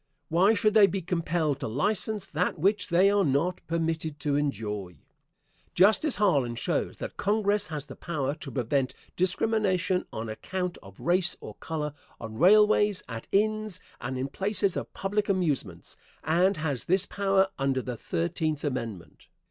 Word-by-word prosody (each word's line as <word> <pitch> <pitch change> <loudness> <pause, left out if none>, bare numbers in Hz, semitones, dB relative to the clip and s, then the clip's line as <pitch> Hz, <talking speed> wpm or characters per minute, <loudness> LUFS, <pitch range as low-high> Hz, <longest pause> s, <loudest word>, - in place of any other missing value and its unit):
Why 190 +7 +4
should 215 0 +2
they 210 -2 +7
be 195 -2 -3
compelled 165 -4 -1
to - - -3
license 205 - -1
that - - -1
which 195 +7 +1
they 185 +3 +4
are 205 -1 +3
not 160 +4 0
permitted 160 -2 -2
to 145 -1 0
enjoy? 105 -10 -2 0.8
Justice 215 - +4
Harlan 140 - +2
shows - - -1
that - - -7
Congress 205 0 +1
has 150 -3 -5
the 135 - -10
power 145 -5 -2
to 150 - -8
prevent 130 +1 -1 0.2
discrimination 185 -1 +1
on 110 +1 -5
account 180 +11 -4
of 95 -1 -15
race 175 +1 +1
or - - -9
color 150 -2 -3 0.3
on 110 -1 -7
railways, 210 +2 +5
at 115 -2 -7
inns, 215 -1 +1 0.2
and 130 +2 -4
in 130 +1 -2
places 195 +4 -1
of - - -4
public 205 +1 -1
amusements, 145 - -1 0.3
and 180 +5 +2
has 145 -5 -2
this 190 +2 +3
power 195 -1 +2
under 135 -1 0
the 125 -2 -4
Thirteenth 145 - -2
Amendment. 115 - -5
170 Hz, 155 wpm, -28 LUFS, 135-195 Hz, 0.8 s, they